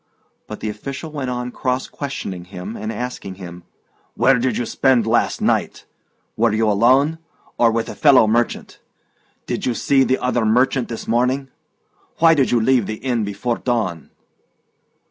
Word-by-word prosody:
But 105 - -8
the 110 - -2
official 140 +9 -6
went 140 -4 -4
on 125 0 -3
cross 125 +1 -2
questioning 100 -11 -6
him 95 +3 -8
and 110 +1 -4
asking 115 -4 -5
him. 90 -2 -10 0.5
"Where 135 -1 +3
did 130 +1 0
you 120 - -1
spend 130 -3 +2
last 115 +1 +1
night? - - 0 0.5
Were 115 0 +2
you 110 +1 +1
alone, 130 +10 +3 0.4
or 120 - +5
with 115 0 -1
a - - -6
fellow 140 -6 +5
merchant? 115 +2 -1 0.7
Did - - -3
you 120 - 0
see 135 +2 +3
the 130 0 +1
other 125 -2 0
merchant 125 +3 +2
this 115 - -6
morning? 125 +4 0 0.7
Why 165 0 +6
did 140 -4 +2
you 120 - +3
leave 120 -2 +2
the 110 - -3
inn 120 -1 -2
before 105 +4 -3
dawn?" 100 - -2
120 Hz, 165 wpm, -20 LUFS, 110-130 Hz, 0.7 s, Why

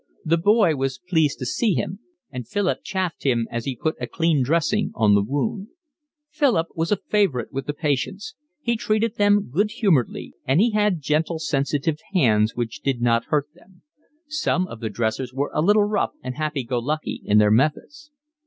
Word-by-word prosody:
The 165 +1 +3
boy 205 -3 +4
was 135 -1 -2
pleased 160 -5 +1
to 130 - -5
see 210 - +1
him, 195 - -3 0.3
and 125 -3 -6
Philip 205 -3 0
chaffed 185 -3 -3
him 120 -4 +1
as 120 -1 -3
he 135 - -2
put 155 +6 -2
a - - -2
clean 165 -4 +1
dressing 170 +9 +1
on 105 -3 +4
the 100 - +5
wound. 145 - -2 0.6
Philip 255 - +1
was 165 +3 -2
a - - +5
favourite 195 - 0
with 135 -1 -4
the 145 - -1
patients; 155 +7 -2 0.3
he 235 -3 +1
treated 220 +1 0
them 205 -6 +3
good 205 +9 +1
humouredly; 175 - 0
and 135 +5 +2
he 230 +3 +4
had 210 -5 +1
gentle, 155 +3 0
sensitive 145 0 -1 0.2
hands 110 -9 +3
which 120 -2 -4
did 135 -3 -1
not 115 -1 +2
hurt 150 -1 0
them: 180 +1 -23 0.4
some 295 - 0
of 115 -10 -9
the 110 - -3
dressers 115 +4 -2
were 140 +2 -1
a - - +1
little 205 +5 +4
rough 205 0 0
and 130 0 -4
happy 150 -1 -2
go 120 +1 -2
lucky 150 +6 -3
in 105 - +3
their 105 -1 +5
methods. 155 - 0
155 Hz, 190 wpm, -23 LUFS, 130-200 Hz, 0.6 s, the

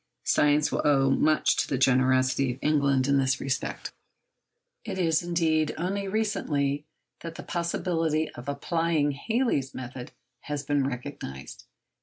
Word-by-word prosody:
Science 150 0 +3
will - - 0
owe 135 -2 +3
much 155 +3 +3
to - - 0
the 135 - -1
generosity 130 0 +3
of 125 - -14
England 140 -3 +2
in 140 0 +3
this 130 -1 +1
respect. 135 -2 -3 0.9
It - - -5
is, 165 -3 +2
indeed, 165 -3 +1
only 195 +4 -2
recently 150 -9 -1 0.3
that 165 -1 -8
the - - -8
possibility 165 -2 -1
of 120 +3 -8
applying 160 +1 0
Halley's 145 - -1
method 125 0 -7 0.3
has 145 -1 -3
been 140 -1 +1
recognised. 70 - -7
145 Hz, 135 wpm, -27 LUFS, 135-165 Hz, 0.9 s, Science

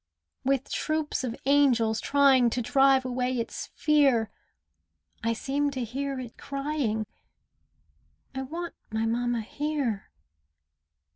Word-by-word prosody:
With 270 0 0
troops 310 -2 -1
of 240 -2 -3
angels 250 -6 +3
trying 275 -4 +4
To 245 - -1
drive 270 +1 +4
away 255 0 -1
its 230 - -4
fear, 275 -8 +3 0.9
I 230 0 +1
seem 280 +5 -1
to 260 -3 -3
hear 270 +3 -3
it 245 -3 -9
crying, 275 -6 -2 1.3
"I 265 - -3
want 335 +6 -5 0.2
my 220 +1 -1
mamma 240 +1 0
here." 275 -4 -2
260 Hz, 115 wpm, -27 LUFS, 230-280 Hz, 1.3 s, trying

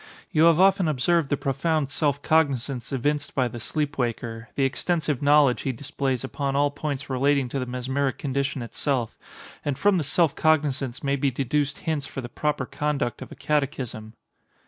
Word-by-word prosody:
You 155 +1 +4
have 165 0 +5
often 190 -2 +5
observed 155 +2 +2
the 145 - +1
profound 140 +2 0
self 145 -2 0
cognizance 140 -5 +1
evinced 145 +2 -1
by 130 -2 +2
the 120 0 -7
sleep 145 +4 -2
waker—the 115 +1 -2
extensive 150 +1 0
knowledge 145 -3 +4
he 135 - -1
displays 130 0 -2
upon 135 +1 -2
all 145 0 +3
points 145 -1 -4
relating 135 0 +2
to 135 - -2
the 125 - -3
mesmeric 130 +2 -1
condition 140 -1 -2
itself; 120 0 -2 0.5
and 145 -3 -2
from 200 -3 +3
this 150 - -2
self 165 +1 +2
cognizance 145 -5 +1
may 140 0 +1
be 140 0 +1
deduced 140 +3 -1
hints 155 -4 -1
for - - -7
the 120 - -7
proper 150 -1 -1
conduct 140 -5 -2
of 130 - -8
a - - -8
catechism." 135 -7 -2
140 Hz, 170 wpm, -25 LUFS, 130-150 Hz, 0.5 s, have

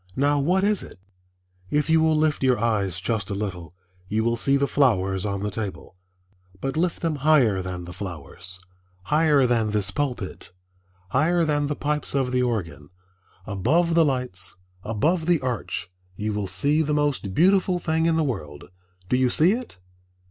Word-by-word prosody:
Now 145 +1 +2
what 180 +7 +2
is 205 0 +2
it? - - -11 0.7
If 150 0 +1
you 160 0 +4
will 160 -1 +3
lift 155 -1 +1
your 130 -2 +3
eyes 105 -5 0
just 105 +1 -2
a 100 - -2
little 90 -5 -5 0.3
you 110 +3 0
will 115 +1 +1
see 135 +4 +2
the 140 - +2
flowers 95 -9 +1
on 100 0 -3
the 105 - -2
table, 100 -3 -6 0.6
but 135 +5 -3
lift 170 +2 0
them 160 -3 0
higher 135 -10 +3
than 90 -1 -6
the 90 - -9
flowers, 90 0 -6 0.4
higher 150 0 +3
than 115 -3 +1
this 105 -2 +1
pulpit, 125 -12 -4 0.6
higher 165 - +2
than 145 -1 0
the 150 - -2
pipes 150 0 -2
of 130 -2 +1
the 125 0 +1
organ, 85 - -3 0.6
above 145 - +1
the 165 0 +5
lights, 125 -10 -1 0.3
above 155 - 0
the 175 -2 +3
arch, 120 -7 -3 0.2
you 105 +2 -3
will 105 -1 -2
see 140 - +2
the 150 -1 0
most 145 -10 -1
beautiful 185 +1 +3
thing 160 -1 0
in 165 - +2
the 160 - +2
world. 75 - -5 0.4
Do 125 - +1
you 130 -1 +3
see 160 +8 +4
it? 245 - -4
125 Hz, 175 wpm, -24 LUFS, 100-155 Hz, 0.7 s, the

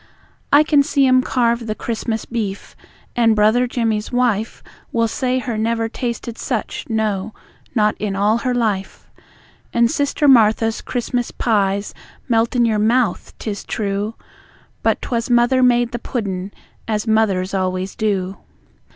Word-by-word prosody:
I 290 +1 +7
can 300 -2 +4
see 280 0 +2
'em 255 0 +5
carve 235 -2 0
the 215 - -2
Christmas 225 -1 -3
beef, 210 -4 -4 0.4
and 230 -3 +4
Brother 220 +4 +3
Jimmy's 225 -3 -1
wife 240 -4 0 0.3
Will 230 -1 +1
say 255 +3 -1
her 240 -3 -3
never 225 +1 0
tasted 235 0 -5
such, 230 -6 -3
no, 215 -2 -1 0.4
not 210 -2 +3
in 205 -2 -2
all 210 +3 +2
her 250 0 -1
life. 210 -5 -2 0.6
And 235 0 +3
Sister 290 -1 +1
Martha's 225 -3 +4
Christmas 245 0 -2
pies 200 -3 0 0.3
melt 230 0 +1
in 240 -1 +4
your 220 -2 +1
mouth, 225 -2 +1
'tis 205 -3 -5
true, 205 +1 -2 0.7
But - - +1
'twas 235 -1 -2
Mother 240 +2 +4
made 240 -1 +3
the 240 - -4
puddin', 200 -6 -4 0.4
as 215 -1 -1
mothers 205 -4 +1
always 185 0 -1
do! 195 -3 -1
225 Hz, 140 wpm, -19 LUFS, 210-245 Hz, 0.7 s, I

